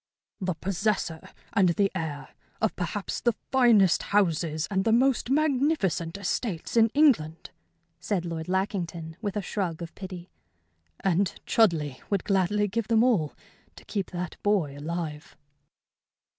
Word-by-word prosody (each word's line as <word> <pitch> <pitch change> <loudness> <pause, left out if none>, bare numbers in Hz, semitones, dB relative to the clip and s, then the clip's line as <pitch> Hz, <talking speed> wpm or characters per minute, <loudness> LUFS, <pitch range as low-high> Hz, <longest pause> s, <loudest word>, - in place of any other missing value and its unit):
"The 185 -3 -1
possessor, 185 -2 -2 0.2
and 190 -3 +4
the 195 +3 +2
heir, 150 -7 -4 0.3
of 220 - 0
perhaps 180 +3 -3
the 240 -2 +2 0.2
finest 230 -8 +5
houses 165 -6 +1
and 190 -1 +1
the 225 - +2
most 250 +1 +3
magnificent 270 - +1
estates 200 -1 -3
in 225 -1 +6
England," 210 - +3 0.5
said 190 -6 -2
Lord 165 -2 -4
Lackington, 175 -4 -2
with 205 -2 -3
a 205 - -2
shrug 180 -4 -2
of 165 - -8
pity. 185 -2 -8 0.7
"And 190 0 +1
Chudleigh 160 - +2
would 200 -3 0
gladly 200 +1 +1
give 215 +2 -2
them 225 -1 +4
all 200 - +2 0.4
to - - -14
keep 200 -4 -3
that 180 -2 -6
boy 190 -9 +1
alive." 155 0 -5
190 Hz, 135 wpm, -27 LUFS, 165-215 Hz, 0.7 s, in